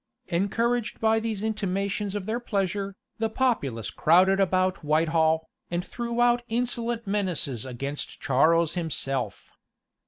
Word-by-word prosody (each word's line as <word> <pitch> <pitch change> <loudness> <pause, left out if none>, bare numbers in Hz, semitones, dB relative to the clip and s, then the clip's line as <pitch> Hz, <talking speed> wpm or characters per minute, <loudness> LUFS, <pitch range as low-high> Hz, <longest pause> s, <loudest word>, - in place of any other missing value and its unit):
Encouraged 230 +6 0
by 225 0 +3
these 220 -2 -3
intimations 200 -1 -1
of 200 -2 -3
their 225 +3 -1
pleasure, 200 -3 -2 0.2
the 225 0 +1
populace 180 - 0
crowded 185 +4 +4
about 185 -1 +1
Whitehall, 160 +1 +2 0.2
and 175 +1 -2
threw 235 +1 -4
out 240 0 +4
insolent 235 0 -1
menaces 180 - -1
against 140 +3 -5
Charles 160 +5 +3
himself. 135 - -2
195 Hz, 120 wpm, -26 LUFS, 160-225 Hz, 0.2 s, crowded